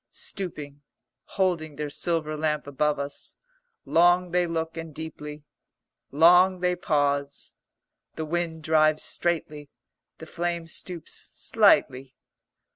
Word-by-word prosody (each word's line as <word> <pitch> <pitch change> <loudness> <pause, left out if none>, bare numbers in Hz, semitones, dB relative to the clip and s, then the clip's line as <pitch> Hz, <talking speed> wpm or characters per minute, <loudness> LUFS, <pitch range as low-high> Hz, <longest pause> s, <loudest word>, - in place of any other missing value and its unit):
Stooping, 150 -7 -6 0.4
holding 170 -6 -1
their 150 0 -4
silver 155 -1 -1
lamp 150 0 -1
above 145 +1 0
us, 140 0 -6 0.5
long 175 +1 +4
they 180 0 +2
look 165 -1 -3
and 165 -2 -7
deeply. 150 -2 -8 0.7
Long 180 +5 +5
they 180 0 +1
pause. 140 -4 -1 0.6
The 160 - -4
wind 165 0 -3
drives 155 -1 +3
straightly; 155 -4 -2 0.5
the 160 - -10
flame 170 +1 -3
stoops 170 0 -6
slightly. 130 0 +1
160 Hz, 110 wpm, -26 LUFS, 150-175 Hz, 0.7 s, Long